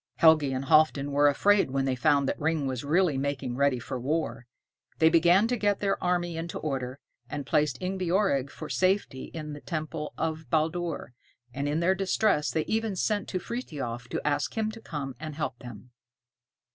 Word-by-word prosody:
Helgi 155 Hz, -4 st, +5 dB
and 130 Hz, +1 st, -2 dB
Halfdan 155 Hz, -2 st, +4 dB
were 145 Hz, +1 st, +4 dB
afraid 200 Hz, +5 st, +3 dB
when 135 Hz, 0 st, 0 dB
they 135 Hz, -, +1 dB
found 140 Hz, 0 st, +3 dB
that -, -, -2 dB
Ring 160 Hz, -2 st, +1 dB
was 130 Hz, -3 st, -3 dB
really 155 Hz, -1 st, +2 dB
making 135 Hz, -3 st, -2 dB
ready 140 Hz, -1 st, +2 dB
for 125 Hz, +2 st, -5 dB
war. 135 Hz, -2 st, -2 dB, 0.5 s
They 160 Hz, -, +5 dB
began 175 Hz, +5 st, +5 dB
to 250 Hz, -, +1 dB
get 205 Hz, -2 st, +1 dB
their 195 Hz, -1 st, -1 dB
army 175 Hz, -2 st, 0 dB
into 165 Hz, +1 st, -4 dB
order, 130 Hz, -3 st, -3 dB, 0.3 s
and 145 Hz, -2 st, -4 dB
placed 145 Hz, -2 st, +1 dB
Ingebjorg 185 Hz, -6 st, 0 dB
for 155 Hz, -, -8 dB
safety 185 Hz, -8 st, 0 dB
in 155 Hz, -2 st, -7 dB
the 145 Hz, -, -9 dB
temple 155 Hz, -2 st, -4 dB
of 160 Hz, -3 st, -3 dB
Baldur, 160 Hz, -2 st, -1 dB, 0.4 s
and 140 Hz, +2 st, -2 dB
in 155 Hz, +3 st, 0 dB
their 185 Hz, +2 st, +4 dB
distress 190 Hz, -4 st, +1 dB
they 160 Hz, -1 st, -1 dB
even 220 Hz, -2 st, -1 dB
sent 205 Hz, +3 st, 0 dB
to 185 Hz, -, -2 dB
Frithiof 140 Hz, -, -5 dB
to -, -, -3 dB
ask 145 Hz, +9 st, -1 dB
him 220 Hz, -1 st, 0 dB
to 225 Hz, +1 st, -11 dB
come 145 Hz, -9 st, -5 dB
and 155 Hz, -2 st, -6 dB
help 135 Hz, -5 st, -3 dB
them. 120 Hz, 0 st, -11 dB
155 Hz, 185 wpm, -28 LUFS, 140-180 Hz, 0.5 s, Helgi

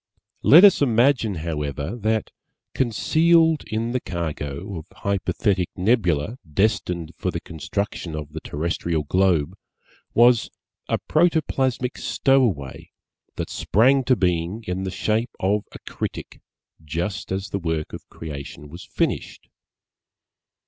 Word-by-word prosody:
Let 165 Hz, +6 st, +8 dB
us 200 Hz, -6 st, +7 dB
imagine, 120 Hz, -4 st, +3 dB
however, 75 Hz, +3 st, -3 dB
that 110 Hz, -1 st, -1 dB, 0.4 s
concealed 160 Hz, +7 st, +3 dB
in 115 Hz, +2 st, -2 dB
the 125 Hz, -, 0 dB
cargo 85 Hz, -, -4 dB
of 80 Hz, -, -13 dB
Hypothetic 100 Hz, -1 st, -1 dB
Nebula 95 Hz, -, +1 dB
destined 90 Hz, -3 st, 0 dB
for -, -, -2 dB
the -, -, -3 dB
construction 85 Hz, 0 st, -4 dB
of 75 Hz, -1 st, -7 dB
the 80 Hz, -, -4 dB
Terrestrial 80 Hz, +1 st, -2 dB
Globe 90 Hz, -1 st, +2 dB, 0.6 s
was 120 Hz, 0 st, +5 dB, 0.4 s
a -, -, +2 dB
Protoplasmic 140 Hz, -6 st, +1 dB
Stowaway 115 Hz, -, +1 dB, 0.5 s
that -, -, -4 dB
sprang 130 Hz, +5 st, +3 dB
to 130 Hz, 0 st, +4 dB
being 90 Hz, +2 st, -1 dB
in 95 Hz, -1 st, -3 dB
the -, -, -2 dB
shape 110 Hz, +5 st, -1 dB
of 100 Hz, +2 st, +1 dB
a -, -, -9 dB
Critic -, -, -6 dB, 0.4 s
just 85 Hz, +8 st, -4 dB
as 95 Hz, +2 st, -3 dB
the 100 Hz, -, -2 dB
work 80 Hz, -3 st, -3 dB
of -, -, -9 dB
Creation 75 Hz, -1 st, -8 dB
was 85 Hz, +4 st, -10 dB
finished. -, -, -3 dB
100 Hz, 120 wpm, -23 LUFS, 80-120 Hz, 0.6 s, Let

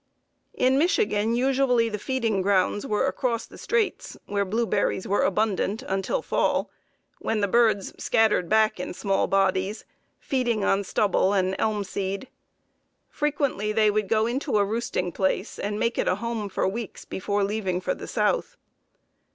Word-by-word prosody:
In 260 Hz, +2 st, +3 dB
Michigan 235 Hz, -, +2 dB
usually 255 Hz, -2 st, +2 dB
the 210 Hz, -2 st, -4 dB
feeding 230 Hz, -5 st, 0 dB
grounds 200 Hz, +5 st, +1 dB
were 210 Hz, +3 st, +1 dB
across 245 Hz, -4 st, -1 dB
the -, -, -14 dB
straits, 465 Hz, -3 st, -1 dB
where 200 Hz, 0 st, 0 dB
blueberries 205 Hz, -1 st, 0 dB
were 200 Hz, -, +2 dB
abundant, 210 Hz, +1 st, 0 dB
until 195 Hz, -, -2 dB
fall, -, -, 0 dB, 0.5 s
when 220 Hz, -1 st, -1 dB
the 200 Hz, -, +2 dB
birds 220 Hz, -2 st, +2 dB
scattered 220 Hz, -6 st, +2 dB
back 215 Hz, -2 st, +3 dB
in 180 Hz, -, -5 dB
small 195 Hz, 0 st, 0 dB
bodies, 195 Hz, +2 st, 0 dB, 0.3 s
feeding 240 Hz, -6 st, -1 dB
on 195 Hz, +1 st, +2 dB
stubble 195 Hz, 0 st, +1 dB
and 190 Hz, -1 st, +1 dB
elm 215 Hz, -2 st, 0 dB
seed. 195 Hz, +4 st, -4 dB, 0.8 s
Frequently 280 Hz, -8 st, -1 dB
they 215 Hz, -1 st, +3 dB
would 210 Hz, -2 st, -1 dB
go 220 Hz, 0 st, +3 dB
into 255 Hz, +1 st, -1 dB
a 200 Hz, -, +3 dB
roosting 210 Hz, -4 st, -2 dB
place, 190 Hz, +2 st, -1 dB
and 205 Hz, +1 st, -2 dB
make 230 Hz, 0 st, 0 dB
it -, -, 0 dB
a -, -, +3 dB
home 230 Hz, -3 st, -3 dB
for 190 Hz, -, 0 dB
weeks 220 Hz, +2 st, -5 dB
before 200 Hz, +2 st, -1 dB
leaving 195 Hz, -3 st, -1 dB
for 180 Hz, -, -1 dB
the -, -, -9 dB
South. -, -, 0 dB
215 Hz, 155 wpm, -25 LUFS, 195-235 Hz, 0.8 s, In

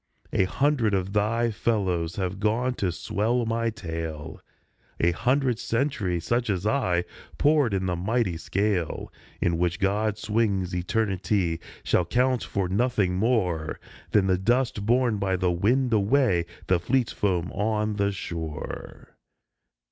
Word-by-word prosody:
" -, -, -33 dB
A 95 Hz, -, +3 dB
hundred 130 Hz, -2 st, +1 dB
of 95 Hz, +1 st, -2 dB
thy 115 Hz, +3 st, +1 dB
fellows 95 Hz, -7 st, 0 dB
have 95 Hz, -1 st, -3 dB
gone 115 Hz, +5 st, +1 dB
to 95 Hz, -7 st, -1 dB
swell 115 Hz, +8 st, 0 dB
my 115 Hz, +1 st, 0 dB
tale; 80 Hz, -7 st, -6 dB, 0.6 s
A 85 Hz, -, +3 dB
hundred 125 Hz, +5 st, +1 dB
centuries 110 Hz, -, -1 dB
such 120 Hz, 0 st, 0 dB
as 95 Hz, -1 st, -1 dB
I, 95 Hz, -8 st, +1 dB, 0.3 s
poured 145 Hz, -5 st, +3 dB
in 95 Hz, -1 st, -1 dB
the 90 Hz, -1 st, 0 dB
mighty 100 Hz, +1 st, 0 dB
scale 95 Hz, -1 st, -1 dB, 0.3 s
In 85 Hz, -1 st, +1 dB
which 90 Hz, 0 st, 0 dB
God 105 Hz, +1 st, +1 dB
swings 105 Hz, -5 st, 0 dB
eternity, 90 Hz, -2 st, 0 dB, 0.2 s
shall 90 Hz, -, +2 dB
count 125 Hz, +6 st, +1 dB
for 95 Hz, -2 st, -1 dB
nothing 100 Hz, -1 st, +1 dB
more 95 Hz, -8 st, 0 dB, 0.3 s
Than 100 Hz, -2 st, +3 dB
the 95 Hz, -1 st, +2 dB
dust 120 Hz, 0 st, +1 dB
borne 120 Hz, -2 st, +3 dB
by 95 Hz, -1 st, +1 dB
the 90 Hz, -1 st, +1 dB
wind 120 Hz, +8 st, +2 dB
away, 105 Hz, -5 st, +3 dB, 0.2 s
the 90 Hz, -2 st, +2 dB
fleet 120 Hz, +6 st, +1 dB
foam 90 Hz, -4 st, -1 dB
on 105 Hz, +1 st, -1 dB
the 100 Hz, 0 st, +1 dB
shore. 80 Hz, -6 st, -6 dB
100 Hz, 140 wpm, -26 LUFS, 90-115 Hz, 0.6 s, A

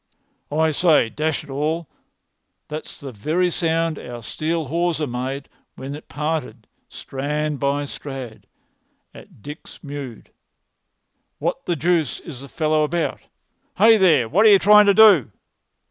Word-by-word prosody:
"I 160 Hz, +1 st, +2 dB
say, 155 Hz, -6 st, +3 dB
dash 155 Hz, +4 st, -2 dB
it -, -, -12 dB
all, 155 Hz, +4 st, -2 dB, 0.8 s
that's 155 Hz, +1 st, -7 dB
the 140 Hz, -2 st, -8 dB
very 160 Hz, -, -1 dB
sound 165 Hz, -2 st, -1 dB
our 120 Hz, -1 st, -9 dB
steel 160 Hz, +7 st, -3 dB
hawser 165 Hz, +1 st, -1 dB
made 130 Hz, +2 st, -5 dB, 0.3 s
when 135 Hz, +1 st, -7 dB
it 150 Hz, -, -11 dB
parted, 150 Hz, -1 st, -4 dB, 0.2 s
strand 150 Hz, +2 st, -4 dB
by 140 Hz, +1 st, 0 dB
strand, 135 Hz, -5 st, -8 dB, 0.7 s
at -, -, -16 dB
Dix 150 Hz, +2 st, -11 dB
mude. 140 Hz, -5 st, -8 dB, 1.1 s
What -, -, -3 dB
the 175 Hz, -, 0 dB
deuce 165 Hz, -2 st, 0 dB
is 135 Hz, -6 st, -10 dB
the 140 Hz, -, -11 dB
fellow 155 Hz, +3 st, +1 dB
about? 165 Hz, +3 st, -2 dB, 0.6 s
Hey, 225 Hz, 0 st, +6 dB
there! 160 Hz, -, +4 dB
what 185 Hz, -, +3 dB
are -, -, +8 dB
you 200 Hz, -, +8 dB
trying 210 Hz, +1 st, +6 dB
to 200 Hz, -, +5 dB
do?" 205 Hz, -, +6 dB
150 Hz, 140 wpm, -21 LUFS, 140-165 Hz, 1.1 s, are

